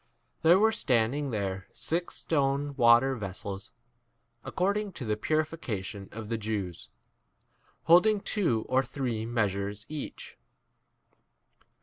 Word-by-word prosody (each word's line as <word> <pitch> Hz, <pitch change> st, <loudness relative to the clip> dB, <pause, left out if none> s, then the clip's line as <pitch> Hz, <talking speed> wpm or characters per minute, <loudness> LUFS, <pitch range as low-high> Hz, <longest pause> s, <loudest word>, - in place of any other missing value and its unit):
6 -, -, -43 dB
There 170 Hz, +3 st, +6 dB
were 220 Hz, +3 st, +4 dB
standing 130 Hz, -, +1 dB
there 95 Hz, -4 st, -3 dB
six 170 Hz, +2 st, -2 dB
stone 140 Hz, -1 st, 0 dB
water 120 Hz, +1 st, +5 dB
vessels, 100 Hz, -2 st, -6 dB, 0.7 s
according 200 Hz, +2 st, -1 dB
to 130 Hz, -, -6 dB
the 105 Hz, -1 st, 0 dB
purification 110 Hz, -8 st, -2 dB
of 110 Hz, 0 st, -7 dB
the 115 Hz, 0 st, -2 dB
Jews, 100 Hz, -5 st, -4 dB, 0.9 s
hold 175 Hz, +5 st, +6 dB
ing 215 Hz, -2 st, +2 dB
two 160 Hz, -, 0 dB
or 130 Hz, +1 st, +3 dB
three 125 Hz, -4 st, -3 dB
measures 105 Hz, -3 st, -1 dB
each. 150 Hz, -2 st, -7 dB
120 Hz, 115 wpm, -29 LUFS, 105-155 Hz, 0.9 s, There